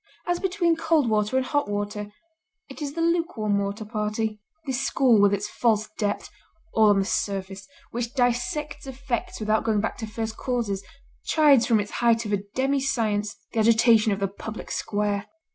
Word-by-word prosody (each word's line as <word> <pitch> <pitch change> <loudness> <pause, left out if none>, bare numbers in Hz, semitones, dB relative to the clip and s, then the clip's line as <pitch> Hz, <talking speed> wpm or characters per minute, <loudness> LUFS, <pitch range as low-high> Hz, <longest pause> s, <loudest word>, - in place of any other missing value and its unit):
As 350 0 0
between 360 -3 +1
cold 325 -4 +2
water 215 +3 +1
and 260 - +1
hot 290 -4 0
water, 205 0 -3 0.6
it 270 - -11
is 285 -1 -3
the 335 - -2
lukewarm 330 - +1
water 200 +2 -3
party. 215 0 -2 0.2
This 265 -2 -1
school 245 -6 +4
with 205 -1 +5
its 200 +1 -1
false 215 -1 +1
depth, 205 -1 -2 0.5
all 220 -1 +5
on 205 - +4
the 195 - +1
surface, 195 -2 -3 0.2
which 240 +2 -4
dissects 270 +4 -1
effects 265 -2 -4
without 215 0 +1
going 220 -2 +1
back 220 - -2
to 220 - -4
first 220 0 -4
causes, 230 -7 -2 0.4
chides 290 -6 +5
from 225 -3 +4
its 205 0 -4
height 235 -1 +3
of 210 - -2
a - - +4 0.2
demi 270 +2 +1
science, 215 -6 -1 0.2
the 225 - 0
agitation 225 0 +5
of 200 - -1
the 195 - +1
public 210 +3 -8
square. 205 -1 -1
220 Hz, 180 wpm, -25 LUFS, 210-265 Hz, 0.6 s, with